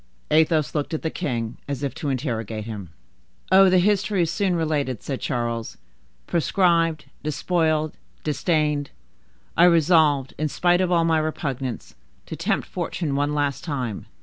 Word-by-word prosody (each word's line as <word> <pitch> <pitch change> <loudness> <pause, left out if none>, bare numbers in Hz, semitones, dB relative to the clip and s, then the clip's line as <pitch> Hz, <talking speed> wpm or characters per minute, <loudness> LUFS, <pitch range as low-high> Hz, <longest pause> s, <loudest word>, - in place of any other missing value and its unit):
Athos 155 -1 +3
looked 150 +1 -2
at - - -5
the 160 - -1
king 115 -3 -3
as 140 -1 -4
if 140 - -2
to 150 - -4
interrogate 115 -5 -3
him. 105 -6 -7 0.6
"Oh, 190 0 +7
the 185 - +4
history 200 0 +2
is 165 - -1
soon 195 -4 0
related," 150 -7 -1
said 135 -3 -4
Charles. 115 -1 -3 0.5
"Proscribed, 165 -1 +2 0.2
despoiled, 155 0 0 0.3
disdained, 150 -2 0 0.7
I 170 - +6
resolved, 160 -5 +4
in 155 - +1
spite 175 +4 +2
of 180 -1 0
all 170 -2 +3
my 160 -1 +3
repugnance, 135 -5 -3 0.3
to - - -6
tempt - - -1
fortune 155 -6 -3
one 145 +1 0
last 145 -2 -1
time. 130 - -4
150 Hz, 150 wpm, -23 LUFS, 135-170 Hz, 0.7 s, Oh